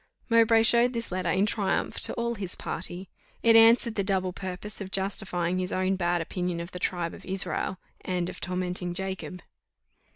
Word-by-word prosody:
Mowbray 230 -1 +5
showed 235 +2 +4
this 230 -3 -4
letter 180 -1 -1
in 190 +4 +3
triumph 205 -3 -1
to - - +2
all 235 0 -1
his 195 -5 -5
party. 180 +2 -4 0.4
It 230 -1 +6
answered 230 +1 +6
the 200 - -1
double 190 -2 0
purpose 190 +3 -4
of 195 - -5
justifying 190 -2 0
his 185 0 -1
own 185 +1 +1
bad 175 -2 0
opinion 175 +1 -3
of 170 +1 -6
the 180 - -7
tribe 175 -2 -2
of - - -11
Israel, 185 -1 -2 0.3
and 180 -2 -1
of - - -7
tormenting 180 -1 -3
Jacob. 190 -1 -5
185 Hz, 175 wpm, -27 LUFS, 180-210 Hz, 0.4 s, It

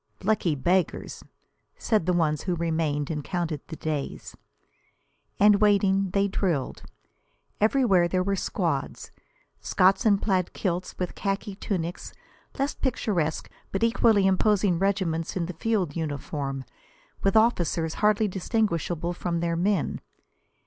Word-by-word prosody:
"Lucky 190 -6 +1
beggars!" 175 +7 -1 0.5
said 215 -7 0
the - - +4
ones 155 -3 +1
who 180 -2 -1
remained, 160 -3 -1
and 150 -2 -3
counted 170 -4 -3
the - - -7
days. 150 -3 -4 1.0
And 205 0 +5
waiting, 195 -2 +3
they 200 +2 +1
drilled. 175 -9 -1 0.8
Everywhere 215 -6 +3
there 185 +1 0
were 200 +1 0
squads: - - -2 0.5
Scots 190 +1 +3
in 205 -3 +4
plaid 190 -3 0
kilts 180 -2 -3
with 180 -1 -3
khaki 195 0 -3
tunics; 180 -4 -4 0.4
less 275 +1 0
picturesque 185 - -1 0.2
but 195 - -1
equally 225 -3 +4
imposing 190 -2 +2
regiments 185 -4 -1
in 170 - -1
the 180 - -6
field 190 -4 -1
uniform, 145 -3 -4 0.6
with 195 +1 +1
officers 175 -7 +2
hardly 210 0 +3
distinguishable 175 -4 -1
from 170 -1 -2
their 170 0 -1
men. 185 0 0
185 Hz, 125 wpm, -26 LUFS, 165-200 Hz, 1.0 s, And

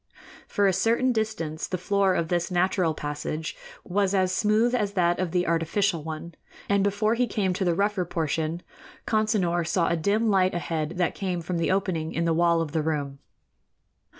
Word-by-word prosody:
For 205 - +1
a 195 - +4
certain 230 +7 +2
distance 210 -9 -2
the 185 - -2
floor 195 +1 +1
of 165 -1 -1
this 175 -1 0
natural 180 -2 +1
passage 150 +2 -4 0.3
was 200 +1 0
as 185 -1 +2
smooth 215 +5 +2
as 210 -5 0
that 175 -3 +2
of 185 -2 0
the 180 +1 0
artificial 170 +1 0
one, 160 +2 -6 0.3
and 200 -1 +2
before 205 +2 +1
he 245 +1 +1
came 195 -6 0
to 190 - -2
the 175 -2 +1
rougher 200 0 +1
portion, 160 0 -2 0.4
Consinor 210 -6 +1
saw 165 +1 +1
a - - +1
dim 210 +6 +1
light 185 -2 +2
ahead 165 -2 -2
that 175 -2 +1
came 185 -3 -2
from 170 +1 -3
the 165 - 0
opening 185 -5 -1
in 170 - 0
the 165 - +2
wall 170 0 +3
of 160 -3 -3
the 160 0 0
room. 145 -3 -2
180 Hz, 185 wpm, -26 LUFS, 165-200 Hz, 0.4 s, a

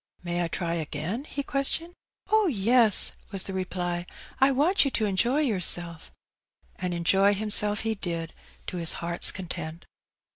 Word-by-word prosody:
May 175 0 -2
I - - -1
try 170 0 -3
again?" 165 - -4
he 280 -2 -5
questioned. 290 +5 -2 0.4
Oh, 435 -2 +4
yes," 230 - +4 0.2
was 195 -2 +3
the 195 - -5
reply; 180 -2 -3 0.2
" - - -21
I 270 - +6
want 305 +9 +3
you 275 - 0
to 225 -4 -1
enjoy 235 +9 +1
yourself. 175 - 0 0.7
And 180 -1 -3
enjoy 195 +4 +3
himself 210 0 +2
he 225 0 -1
did, 170 -5 -5 0.3
to 180 - -6
his 165 -2 +1
heart's 170 0 +2
content. 170 -3 -7
190 Hz, 155 wpm, -26 LUFS, 175-240 Hz, 0.7 s, I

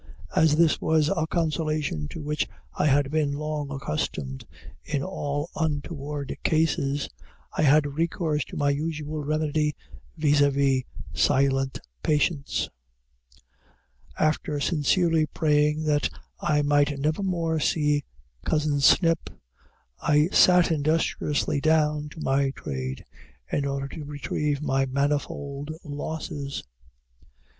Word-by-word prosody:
As 155 -1 +5
this 165 0 +3
was 155 -1 +3
a 160 -1 0
consolation 155 - -1
to 155 - -7
which 150 +1 -1 0.3
I 150 - +1
had 140 0 +3
been 150 -2 +1
long 150 0 -3
accustomed 75 - -3 0.4
in 145 -2 -2
all 145 -4 -3
untoward 145 -2 -3
cases, 145 -3 +1 0.5
I - - 0
had 150 0 +5
recourse 155 0 -1
to - - -9
my 145 -1 +2
usual 150 0 -3
remedy, 150 0 0 0.4
viz., 145 -1 +3 0.7
silent 135 - +2 0.2
patience. 150 -1 +1 1.5
After 155 -1 0
sincerely 165 +1 +2
praying 150 0 +2
that 150 -1 +2 0.3
I 150 -1 +1
might 145 0 +2
never 155 +6 0
more 170 -4 0
see 150 -1 +1 0.4
cousin 150 -2 +1
Snip, 165 +4 +4 0.7
I 150 +2 +3
sat 180 -2 +5
industriously 150 -1 0
down 150 -1 +2
to 160 - -12
my 135 0 +2
trade, 65 -1 -5 0.5
in 140 -1 0
order 140 0 -2
to 155 - -7
retrieve 145 0 -2
my 135 -2 +1
manifold 140 +1 -2
losses. 145 -1 -5
150 Hz, 110 wpm, -26 LUFS, 140-155 Hz, 1.5 s, As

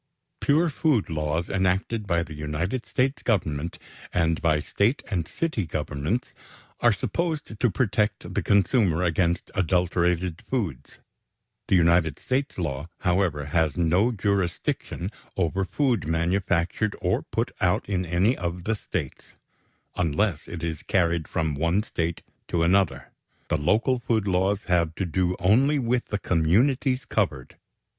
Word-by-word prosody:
= - - -52
Pure 160 +3 +3
food 140 - +1
laws 75 +2 -1
enacted 95 +3 0
by 85 -2 +1
the 80 - -9
United 75 +11 -3
States 135 +3 0
Government, 85 - -1 0.3
and 85 -1 +1
by 80 -2 +3
State 105 - 0
and 85 -5 -1
City 110 - -2
Governments, 80 - -2 0.5
are 120 - +5
supposed 145 - -2
to 120 - +3
protect 105 -1 0
the - - 0
consumer 100 -4 +3
against 85 0 0
adulterated 90 -1 +1
foods. 100 - -3 0.7
The - - +3
United 85 -3 +3
States 135 +2 -2
law, 75 -3 -3
however, 90 -5 +1
has 80 +2 +1
no 90 +7 +3
jurisdiction 95 -2 -1 0.3
over 95 +2 0
food 120 - 0
manufactured 85 +4 0
or - - +1
put - - -2
out - - +2
in 95 -2 0
any 90 +8 +2
of 85 0 -4
the 110 +3 0
States, - - -6 0.6
unless 85 0 0
it 85 -1 -7
is 80 -3 -3
carried 85 -4 +1
from 80 -2 -1
one 85 +8 +1
State 85 -5 -3 0.2
to 85 -1 0
another. 95 +1 +2 0.4
The - - +2
local 115 - +2
food 115 -4 0
laws 95 +1 +1
have 85 -3 +1
to 95 - -2
do 90 +1 0
only 125 +11 +3
with 125 -1 0
the 105 - -1
communities 125 - +2
covered. 65 -2 -2
90 Hz, 140 wpm, -25 LUFS, 85-110 Hz, 0.7 s, are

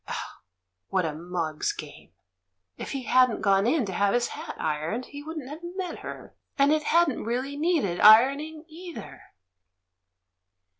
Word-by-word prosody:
Oh, - - -6 0.5
what 185 -3 +1
a 155 - -2
mug's 165 -1 -3
game! - - -11 0.7
If - - -7
he 270 -2 -4
hadn't 255 -1 +3
gone 195 +1 +3
in 270 -1 +2
to 190 - -5
have 200 +4 +2
his 240 0 +1
hat - - -7
ironed, 160 +11 -2
he 285 - -9
wouldn't 310 -3 -7
have 300 +4 -8 0.2
met 360 -3 -4
her. - - -9 0.2
And 280 +1 +4
it 305 -1 0
hadn't 335 -5 +2
really 255 +5 -2
needed 295 - 0
ironing 280 +9 +5
either 345 +1 -10
255 Hz, 150 wpm, -26 LUFS, 195-310 Hz, 0.7 s, ironing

